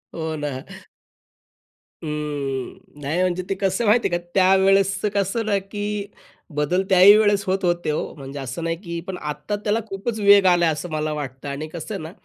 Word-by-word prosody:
हो 160 -1 -3
ना. 150 0 -3 1.5
अ, 155 - -4
नाही, 145 +1 -4
म्हणजे 185 0 0
ते 195 - 0
कसंय 195 +4 +1
माहिती 230 +3 +4
आहे 175 - +2
का? 175 - -11
त्यावेळेसचं 195 +1 +3
कसं 200 +3 0
ना, 205 -2 +2
की 205 +1 -4 0.5
बदल 150 +6 +1
त्या 190 -2 +5
ही 200 +3 +9
वेळेस 205 -2 +3
होत 190 +1 -1
होते, 175 -2 0
हो, 150 - -3
म्हणजे 140 0 -8
असं 135 +5 -5
नाही 165 0 -1
की 170 -2 -4
पण 190 -1 -4
आत्ता 150 +6 -4
त्याला 215 +2 +1
खूपच 215 +3 -4
वेग 200 -1 +6
आलाय, 175 -1 +3
असं 155 +4 -6
मला 155 0 -1
वाटतं. 135 -2 -6
आणि 140 +3 -4
कसं 170 +6 -7
आहे 195 - -5
ना, 160 - -7
180 Hz, 185 wpm, -22 LUFS, 150-195 Hz, 1.5 s, ही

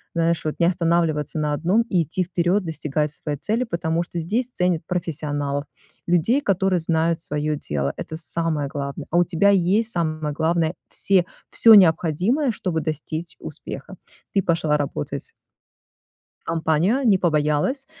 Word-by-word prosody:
знаешь, 170 0 +1
вот 155 - -1
не 170 - +4
останавливаться 165 -3 0
на 150 -1 0
одном, 180 +10 +2
и 180 - +2
идти 175 +4 -2
вперёд, 180 +2 0
достигать 150 -2 -2
своей 150 -1 -5
цели, 220 - 0
потому 170 -5 -1
что 170 0 -6
здесь 220 +10 -1
ценят 180 -6 0
профессионалов, 145 -5 -2 0.4
людей, 180 - +2
которые 195 -5 +1
знают 165 0 +1
своё 150 0 -1
дело. 70 - -2
Это 160 - -6
самое 160 -3 -1
главное. 140 +1 -5
А 170 - +2
у 175 - +6
тебя 175 +4 +2
есть 200 +5 +2
самое 155 -4 -2
главное 160 +1 +1 0.2
все, 190 -3 +2 0.3
всё 225 -1 +7
необходимое, 185 - +3
чтобы 180 -6 -2
достичь 155 +2 -5
успеха. - - -8 0.4
Ты 195 - +3
пошла 165 -3 +1
работать 140 - -4 1.1
в - - -46
компанию, 165 - +1
не 200 -4 +5
побоялась. 155 - +1
165 Hz, 145 wpm, -22 LUFS, 155-185 Hz, 1.1 s, всё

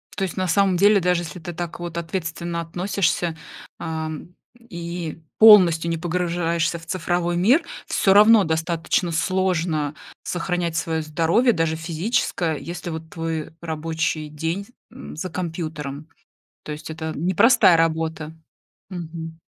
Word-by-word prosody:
То 195 - -2
есть 185 - -3
на 185 -1 0
самом 190 +1 +3
деле, 205 +2 +5
даже 180 -1 +1
если 170 +1 -7
ты 175 +2 -7
так 170 0 -5
вот 170 -1 -6
ответственно 170 0 -3
относишься, 175 -1 -1 0.4
ам, 160 0 -5 0.3
и 170 -7 -6 0.2
полностью 175 -7 +7
не 165 - -1
погружаешься 170 -1 -1
в 165 - -14
цифровой 175 0 -1
мир, 250 - +4 0.2
всё 195 - +3
равно 215 0 +7
достаточно 165 +2 0
сложно 165 -4 0 0.3
сохранять 175 -1 -2
свое 160 -1 -1
здоровье, 165 +11 +2
даже 165 -1 0
физическое, 165 -1 -1
если 175 +2 -6
вот 160 0 -6
твой 165 -2 -4
рабочий 160 -1 -2
день, 165 +6 -3 0.3
м, - - -10
за 180 +4 -4
компьютером. 160 -4 -5 0.5
То 150 - -7
есть, 155 +2 -7
это 160 0 -4
непростая 185 - +5
работа. 160 -1 -1 0.6
Мгм. 165 -2 -7
170 Hz, 130 wpm, -22 LUFS, 160-180 Hz, 0.6 s, полностью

